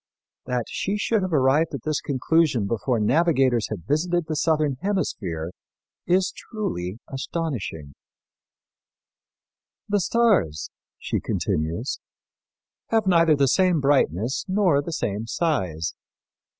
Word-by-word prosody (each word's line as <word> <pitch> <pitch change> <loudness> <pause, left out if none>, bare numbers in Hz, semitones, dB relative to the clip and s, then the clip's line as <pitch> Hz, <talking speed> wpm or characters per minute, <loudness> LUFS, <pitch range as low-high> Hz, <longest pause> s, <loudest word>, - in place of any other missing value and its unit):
That 125 -2 -1
she 200 +2 -2
should 215 +1 +1
have 185 -1 -2
arrived 145 +2 +3
at 130 - -7
this 155 -1 -1
conclusion 140 -3 +1
before 115 +3 0
navigators 130 -2 +2
had 95 -7 -6
visited 175 - 0
the 155 0 -3
southern 150 -3 +1
hemisphere 90 - -2 0.6
is 185 +2 +2
truly 140 - -4
astonishing. 130 - -4 1.9
"The 205 0 +2
stars," 195 - +1 0.3
she - - -2
continues, 80 - -2 0.9
"have 225 -2 +1
neither 165 -4 +5
the 140 -1 +3
same 180 +3 +3
brightness 130 - +1
nor 185 -7 +3
the 170 - -6
same 110 -7 -2
size. 95 - -1
145 Hz, 110 wpm, -24 LUFS, 110-175 Hz, 1.9 s, neither